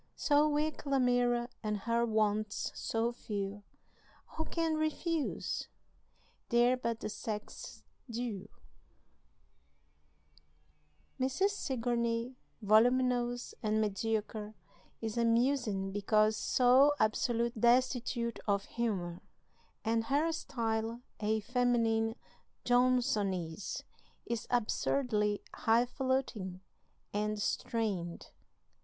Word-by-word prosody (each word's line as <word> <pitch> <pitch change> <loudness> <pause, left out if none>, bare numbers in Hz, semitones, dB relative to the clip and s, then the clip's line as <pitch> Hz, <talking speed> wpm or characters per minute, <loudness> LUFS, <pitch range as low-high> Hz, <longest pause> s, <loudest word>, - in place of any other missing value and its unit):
So 295 +1 +3
weak 300 0 -1
Lamira 245 -3 +2
and 210 -1 -1
her 235 +2 +1
wants 215 -1 0
so 230 +1 -1
few 205 -3 -4 0.7
Who 320 - -4
can 330 -1 0
refuse? 310 0 -1 0.8
they're 240 +1 +4
but 230 -2 -3
the - - -2
sex's 210 0 -6 0.3
due." 230 -4 -4 2.7
Mrs. 265 +10 +2
Sigourney, 240 - -1 0.3
voluminous 245 +3 +3
and 215 -1 +1
mediocre, 215 0 -2 0.5
is 225 +1 -2
amusing 230 -4 +2
because 215 +2 +3
so 260 +6 +5
absolutely 230 +1 +1
destitute 240 -1 +2
of 200 -1 +1
humor, 185 -7 -2 0.6
and 225 0 +1
her 290 +6 +2
style, 230 -6 -2 0.2
a 215 +1 0
feminine 230 -2 +1 0.5
Johnsonese, 210 -8 +1 0.4
is 235 -2 -3
absurdly 215 -2 +1
hifalutin 240 -5 0 0.5
and 210 +1 -1
strained. 200 -6 -2
230 Hz, 85 wpm, -33 LUFS, 215-250 Hz, 2.7 s, so